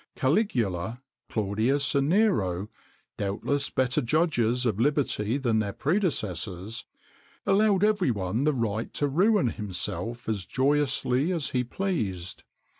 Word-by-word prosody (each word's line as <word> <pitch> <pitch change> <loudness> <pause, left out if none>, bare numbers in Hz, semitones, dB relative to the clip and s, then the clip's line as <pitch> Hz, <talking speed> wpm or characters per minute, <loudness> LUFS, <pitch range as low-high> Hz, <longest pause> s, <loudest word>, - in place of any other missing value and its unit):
[XXIX - - -33
90] - - -20
Caligula, 120 - +1 0.3
Claudius, 115 +7 0
and 140 +1 +2
Nero 105 - +2 0.5
doubtless 105 +8 -1
better 130 +3 +1
judges 125 -4 +1
of 110 -4 0
liberty 135 -4 +1
than 120 -5 +1
their 100 -2 -2
predecessors 110 - -2 0.6
allowed 205 -1 +3
every 210 -7 +3
one 105 +2 -1
the 150 +1 +3
right 115 -2 -2
to 145 - +1
ruin 180 - +3
himself 105 +2 -4
as 100 -5 -2
joyously 140 +1 +1
as 165 -6 -1
he 125 -1 +1
pleased. 110 - -3
125 Hz, 125 wpm, -27 LUFS, 105-150 Hz, 0.6 s, allowed